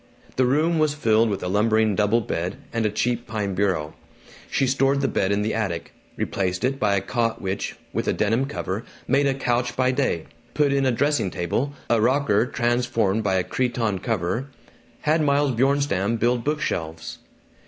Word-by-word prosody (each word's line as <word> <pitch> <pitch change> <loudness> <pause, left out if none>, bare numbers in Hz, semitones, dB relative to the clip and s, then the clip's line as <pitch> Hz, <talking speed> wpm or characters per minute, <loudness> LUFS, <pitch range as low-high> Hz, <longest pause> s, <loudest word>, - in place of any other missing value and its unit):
The 130 -1 +3
room 160 +5 +2
was 155 -1 +2
filled 115 -5 +3
with 100 -3 -3
a - - -2
lumbering 110 +2 +2
double 105 +3 +2
bed 90 -3 -3 0.2
and 115 -2 +1
a - - 0
cheap 120 +3 -1
pine 105 -3 -2
bureau. 90 -6 0 0.6
She 135 - +1
stored 135 +1 +2
the 135 - +2
bed 95 0 0
in 100 +1 +1
the 110 - -1
attic; 90 -7 -3 0.2
replaced 90 -2 -2
it 135 +2 0
by 100 -2 +2
a 95 - +1
cot 115 +2 -1
which, 95 +1 -3 0.2
with - - -2
a - - +3
denim 115 +5 +1
cover, 105 -6 -4 0.2
made 140 +1 +3
a 135 - +1
couch 120 -2 0
by 130 0 +2
day; 130 - 0 0.3
put 145 -1 +3
in 135 -1 +2
a - - +3
dressing 130 -4 +1
table, 115 - -2
a 115 -2 +2
rocker 125 -2 +2
transformed 120 -4 0
by 95 -2 +1
a 95 - +2
cretonne 120 -5 -1
cover; 110 +3 -2 0.5
had 155 +2 +2
Miles 145 -1 +2
Bjornstam 120 -5 +1
build 120 +1 +1
book 150 +1 -1
shelves. 80 0 -4
115 Hz, 185 wpm, -24 LUFS, 100-135 Hz, 0.6 s, The